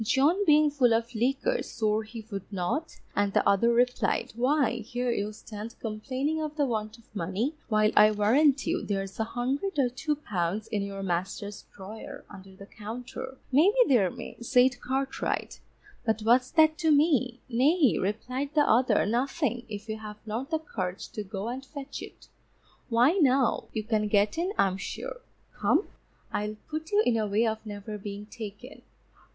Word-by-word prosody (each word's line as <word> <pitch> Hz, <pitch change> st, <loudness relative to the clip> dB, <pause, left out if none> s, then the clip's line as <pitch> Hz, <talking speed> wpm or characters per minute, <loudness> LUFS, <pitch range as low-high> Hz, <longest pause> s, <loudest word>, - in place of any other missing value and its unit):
John 290 Hz, -, +3 dB
being 300 Hz, -2 st, +5 dB
full 250 Hz, -5 st, +4 dB
of 230 Hz, +2 st, -2 dB
liquor 275 Hz, -, +1 dB
swore 215 Hz, 0 st, 0 dB
he 220 Hz, 0 st, -9 dB
would 200 Hz, 0 st, -6 dB
not, 200 Hz, -, -2 dB, 0.2 s
and 200 Hz, -1 st, +1 dB
the -, -, +3 dB
other 215 Hz, +4 st, +4 dB
replied, 245 Hz, +1 st, +1 dB
_Why, 255 Hz, -1 st, +1 dB
here 245 Hz, +2 st, -2 dB
you 210 Hz, -2 st, -1 dB
stand 215 Hz, +1 st, -8 dB
complaining 260 Hz, +8 st, -2 dB
of 305 Hz, -1 st, -4 dB
the 290 Hz, -2 st, +2 dB
want 215 Hz, -2 st, -3 dB
of 230 Hz, -2 st, -24 dB
money, 200 Hz, -, -1 dB, 0.2 s
while 215 Hz, -1 st, +3 dB
I 210 Hz, 0 st, +8 dB
warrant 260 Hz, +7 st, +3 dB
you, 340 Hz, +2 st, 0 dB
there's 195 Hz, -1 st, -3 dB
a -, -, +3 dB
hundred 265 Hz, -, -2 dB
or 265 Hz, -3 st, +3 dB
two 300 Hz, +5 st, -2 dB
pounds 205 Hz, -, -2 dB
in 210 Hz, -, -1 dB
your 195 Hz, 0 st, -5 dB
master's 195 Hz, +3 st, -3 dB
drawer 205 Hz, +3 st, -9 dB
under 190 Hz, -1 st, -12 dB
the 200 Hz, -, -11 dB
counter. 240 Hz, +5 st, -7 dB
Maybe 330 Hz, -, +5 dB
there 220 Hz, -9 st, +4 dB
may_, 235 Hz, -, -9 dB
said 250 Hz, +2 st, +3 dB
Cartwright, 265 Hz, +1 st, -2 dB, 0.4 s
but 220 Hz, -1 st, 0 dB
what's 245 Hz, +3 st, +4 dB
that 315 Hz, -1 st, +4 dB
to 325 Hz, -2 st, +2 dB
me? 285 Hz, -5 st, +3 dB
Nay, 270 Hz, -, +3 dB
replied 255 Hz, +9 st, -3 dB
the 300 Hz, -, +6 dB
other, 245 Hz, -4 st, +3 dB
_nothing, 245 Hz, +2 st, -1 dB
if 210 Hz, 0 st, -7 dB
you 220 Hz, 0 st, -3 dB
have 210 Hz, -1 st, -8 dB
not 230 Hz, +6 st, -4 dB
the 320 Hz, -, +1 dB
courage 190 Hz, -, -5 dB
to 215 Hz, -, -5 dB
go 195 Hz, +1 st, -5 dB
and 255 Hz, +3 st, -4 dB
fetch 280 Hz, 0 st, -8 dB
it; -, -, -11 dB, 0.6 s
why 240 Hz, +4 st, +5 dB
now, 265 Hz, -3 st, +3 dB
you 215 Hz, -, -3 dB
can 215 Hz, -1 st, 0 dB
get 205 Hz, 0 st, +2 dB
in 360 Hz, +3 st, 0 dB
I'm 190 Hz, -1 st, +2 dB
sure. -, -, -6 dB, 0.3 s
Come, -, -, +2 dB, 0.5 s
I'll 210 Hz, +1 st, -2 dB, 0.2 s
put 315 Hz, +1 st, -4 dB
you 415 Hz, +1 st, +4 dB
in 235 Hz, -2 st, +3 dB
a 215 Hz, -1 st, 0 dB
way 210 Hz, +3 st, +2 dB
of 220 Hz, -1 st, -2 dB
never 210 Hz, 0 st, -6 dB
being 205 Hz, 0 st, -6 dB
taken. 220 Hz, +3 st, -9 dB
235 Hz, 175 wpm, -28 LUFS, 210-275 Hz, 0.6 s, I